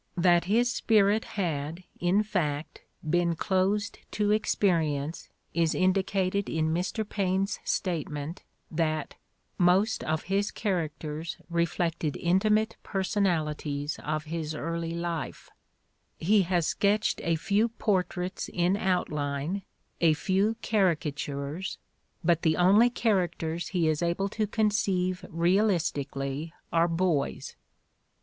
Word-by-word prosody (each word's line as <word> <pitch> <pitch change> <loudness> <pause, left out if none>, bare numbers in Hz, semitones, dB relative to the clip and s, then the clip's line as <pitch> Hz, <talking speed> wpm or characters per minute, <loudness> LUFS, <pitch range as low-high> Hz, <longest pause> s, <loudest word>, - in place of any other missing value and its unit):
That 175 0 +4
his 240 +6 +2
spirit 215 -2 +3
had, 165 -2 -2 0.2
in 185 +4 +3
fact, 155 -8 -2 0.3
been 170 +1 +2
closed 195 +5 0
to 210 0 +1
experience 165 -8 0 0.2
is 165 -2 +2
indicated 190 +1 +1
in 160 0 0
Mr. 190 +5 -2
Paine 195 -2 +1
's 200 - -5
statement 155 -3 -2 0.3
that 155 -2 -1 0.5
"most 190 +5 +3
of 155 0 -1
his 200 +1 0
characters 160 -4 -3
reflected 170 -2 0
intimate 210 +5 +2
personalities 155 -7 -1
of 155 0 -2
his 155 -1 -4
early 165 +1 -3
life"; 170 -4 -4 0.7
he 205 +5 +4
has 175 -3 +2
sketched 210 +5 +1
a 170 -1 +2
few 200 +7 +2
portraits 185 -4 -1
in 175 +1 +2
outline, 155 -2 -1 0.4
a 165 -2 +5
few 195 +7 +1
caricatures, 155 -4 -1 0.5
bu 170 - +6
t 165 - -4
the 160 -1 +2
only 200 +7 +6
characters 175 -8 0
he 175 -4 +1
is 155 0 +1
able 175 +3 0
to 215 +1 -1
J3onceive_. 195 -4 0
realisti 170 -3 +2
cally 140 +4 -4 0.2
are 165 0 +4
boys. 165 -4 -1
175 Hz, 115 wpm, -28 LUFS, 160-195 Hz, 0.7 s, bu